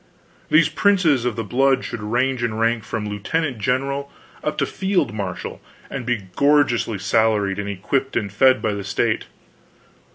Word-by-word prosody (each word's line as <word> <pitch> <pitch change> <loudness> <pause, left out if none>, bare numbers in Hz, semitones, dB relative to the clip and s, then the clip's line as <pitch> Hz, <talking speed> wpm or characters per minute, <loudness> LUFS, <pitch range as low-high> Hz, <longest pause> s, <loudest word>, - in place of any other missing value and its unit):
These 155 +1 +5
princes 160 - +2
of 120 -3 0
the 115 - -3
blood 135 +5 +2
should 115 - -5
range 120 +4 0
in 115 -2 -1
rank 115 0 +1
from 105 -1 -4
Lieutenant 125 +6 -2
General 135 +5 -1 0.3
up 150 - -2
to - - +2
Field 190 - 0
Marshal, 100 -4 -5 0.3
and 125 -4 -5
be 120 -5 0
gorgeously 140 -7 +3
salaried 100 0 +1
and 100 0 -3
equipped 115 +8 -1
and 100 -2 -2
fed 130 +4 +4
by 110 - +1
the 100 -1 -4
state. 100 - 0
120 Hz, 160 wpm, -21 LUFS, 105-140 Hz, 0.3 s, These